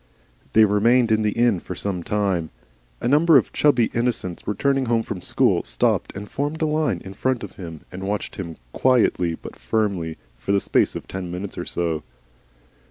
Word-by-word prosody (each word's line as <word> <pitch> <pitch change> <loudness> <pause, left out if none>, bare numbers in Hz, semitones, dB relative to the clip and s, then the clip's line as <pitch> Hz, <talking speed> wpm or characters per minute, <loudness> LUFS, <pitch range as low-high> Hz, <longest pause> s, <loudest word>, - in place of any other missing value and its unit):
They 110 0 +7
remained 115 +4 +3
in 110 0 +3
the 105 -1 +1
inn 115 -5 +3
for 90 - -7
some 95 -1 -3
time. 95 -4 0 0.5
A - - 0
number 150 +3 +6
of 125 - +1
chubby 145 -6 +3
innocents 115 -7 -2
returning 135 +5 +1
home 115 -1 +2
from 100 -6 -5
school, - - +2
stopped - - 0
and 100 +1 -6
formed 145 +6 -3
a - - +4
line 150 - 0
in 95 - -7
front 130 +4 -1
of - - -9
him, 80 -4 -8
and 95 +1 -6
watched 105 +1 -3
him 85 -4 -6 0.2
quietly 110 -10 +2
but - - -10
firmly 95 -7 -1 0.2
for 100 +11 -1
the 100 - +4
space - - +1
of - - -6
ten 95 -2 -5
minutes 90 +3 -5
or - - -4
so. 85 -3 -1
105 Hz, 185 wpm, -23 LUFS, 90-120 Hz, 0.5 s, They